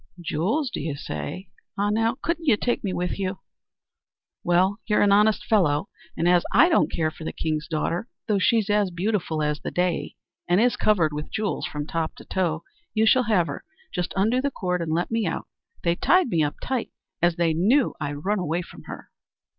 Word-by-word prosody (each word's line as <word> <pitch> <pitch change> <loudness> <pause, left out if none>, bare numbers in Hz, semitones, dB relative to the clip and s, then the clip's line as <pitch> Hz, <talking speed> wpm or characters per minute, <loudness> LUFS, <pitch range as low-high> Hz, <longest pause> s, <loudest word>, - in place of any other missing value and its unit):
"Jewels, 195 - -1
do - - -4
you 150 -1 -3
say? 175 +5 -6 0.3
Ah, 205 +1 +1
now, 225 +3 +1
couldn't 335 -1 -1
you 225 -7 +5
take 240 +2 -1
me 195 - -1
with 180 +2 -2
you?" 190 0 -2 1.1
"Well, 185 +3 +2
you're 210 -2 +3
an 205 - +4
honest 210 +1 +4
fellow, 155 -9 +2 0.3
and 165 - +1
as 175 -1 +5
I 340 - +6
don't 330 - +3
care 160 -1 0
for 160 - -11
the - - -3
king's 155 -2 -2
daughter, 170 +5 -2 0.2
though 210 -3 +2
she's 215 +2 +3
as 205 -2 +2
beautiful 175 -4 -1
as 150 0 0
the - - -4
day, 180 -1 -1 0.3
and 175 +2 +3
is 245 +2 +3
covered 170 -8 +2
with 150 +1 -5
jewels 215 -2 -2
from 145 -1 -4
top 160 0 -2
to - - -13
toe, 170 -3 -1 0.3
you 220 +1 +4
shall 255 +3 +4
have 185 -6 +4
her. - - -6 0.3
Just 180 -3 -2
undo 225 +6 +2
the 280 - 0
cord 180 -8 -2
and 165 -1 -2
let 170 +6 0
me 225 -1 +1
out; - - -3 0.4
they 170 - +3
tied 360 - +3
me 165 -7 +2
up 145 - -1
tight, 255 -3 -2 0.3
as 175 0 +3
they 170 -1 +2
knew 225 - +3
I'd 145 +1 -4
run 205 +1 +1
away 175 0 -1
from - - -14
her." - - -9
185 Hz, 205 wpm, -25 LUFS, 165-215 Hz, 1.1 s, I